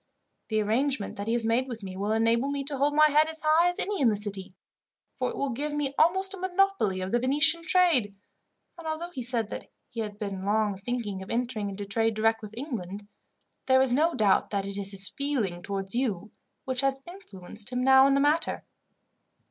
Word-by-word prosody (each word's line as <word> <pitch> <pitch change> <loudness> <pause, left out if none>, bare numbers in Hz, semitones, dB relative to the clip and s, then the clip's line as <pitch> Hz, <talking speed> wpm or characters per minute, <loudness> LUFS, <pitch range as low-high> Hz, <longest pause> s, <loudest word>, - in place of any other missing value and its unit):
The 215 -1 0
arrangement 240 +1 -1
that 200 +1 -5
he 225 - 0
has 235 -1 +2
made 235 +4 +1
with 230 -4 -7
me, 190 -1 -7
will 200 +2 -2
enable 230 +4 +1
me 280 -1 -3
to 280 +1 -5
hold 285 +2 +1
my 305 0 +5
head 305 +2 +4
as 320 0 -2
high 325 +3 +4
as 355 - -4
any 405 -4 -2
in 250 - +5
the 215 - +1
City, 200 -3 -4 0.6
for - - -2
it 460 - -7
will 280 -1 -1
give 290 +5 -3
me 290 -2 -2
almost 380 +4 +3
a 385 - -8
monopoly 375 - 0
of 185 +1 -4
the 240 - +2
Venetian 300 +6 +4
trade; 325 - +2 0.6
and 330 - -8
although 325 +3 -4
he 270 - -6
said 235 -3 0
that - - -7 0.2
he 230 - -7
had 210 -2 -5
long 205 +1 -1
been 195 0 -13
thinking 220 -5 -4
of 190 - -10
entering 230 -4 -2
into 200 +1 -6
trade 225 +2 0
direct 225 +1 +1
with 215 +1 -10
England, 205 - -6 0.6
there 260 0 +5
is 260 -2 +3
no 320 +6 +2
doubt 205 -3 +2
that 200 -1 -2
it 200 0 -6
is 200 -1 -1
his 195 -1 +4
feeling 230 -10 -2
towards 195 0 -3
you, 225 -6 -2 0.3
which 260 -1 -2
has 270 0 -1
influenced 215 - -4
him 250 0 -1
now 265 +1 +6
in 275 - +3
the - - +2
matter. 295 +4 +1
240 Hz, 215 wpm, -27 LUFS, 205-290 Hz, 0.6 s, now